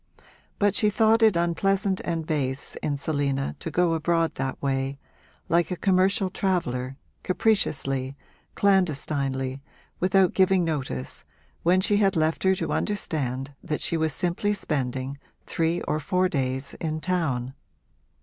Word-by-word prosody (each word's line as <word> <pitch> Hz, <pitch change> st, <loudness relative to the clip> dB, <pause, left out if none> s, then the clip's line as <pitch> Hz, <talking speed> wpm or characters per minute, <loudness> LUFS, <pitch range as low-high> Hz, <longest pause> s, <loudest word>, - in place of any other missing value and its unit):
But 205 Hz, -1 st, +3 dB
she 210 Hz, +1 st, +3 dB
thought 220 Hz, +2 st, +3 dB
it 220 Hz, -4 st, +5 dB
unpleasant 190 Hz, +3 st, +1 dB
and 165 Hz, -2 st, -2 dB
base 140 Hz, -4 st, -2 dB
in 145 Hz, -2 st, -1 dB
Selina 140 Hz, -2 st, -1 dB
to -, -, -4 dB
go 170 Hz, +1 st, +2 dB
abroad 165 Hz, 0 st, +1 dB
that 135 Hz, 0 st, -3 dB
way, 135 Hz, 0 st, -1 dB, 0.5 s
like 170 Hz, +1 st, +2 dB
a 180 Hz, -, -1 dB
commercial 190 Hz, +1 st, +2 dB
traveller, 135 Hz, -10 st, -1 dB, 0.2 s
capriciously, 140 Hz, -, 0 dB, 0.4 s
clandestinely, 140 Hz, -8 st, +1 dB, 0.4 s
without 185 Hz, 0 st, +3 dB
giving 190 Hz, -1 st, +4 dB
notice, 130 Hz, -, -3 dB, 0.4 s
when 180 Hz, +2 st, +3 dB
she 205 Hz, +2 st, +2 dB
had 195 Hz, -2 st, +3 dB
left 160 Hz, 0 st, +1 dB
her 190 Hz, 0 st, +3 dB
to -, -, -2 dB
understand 140 Hz, -, -2 dB
that 155 Hz, -4 st, -3 dB
she -, -, 0 dB
was 160 Hz, -1 st, +1 dB
simply 180 Hz, +7 st, 0 dB
spending 135 Hz, -4 st, -2 dB, 0.3 s
three 165 Hz, +1 st, 0 dB
or 155 Hz, -, -1 dB
four 185 Hz, +4 st, +1 dB
days 135 Hz, -3 st, -2 dB
in 155 Hz, -2 st, -2 dB
town. 150 Hz, -8 st, -1 dB
165 Hz, 135 wpm, -26 LUFS, 135-185 Hz, 0.5 s, it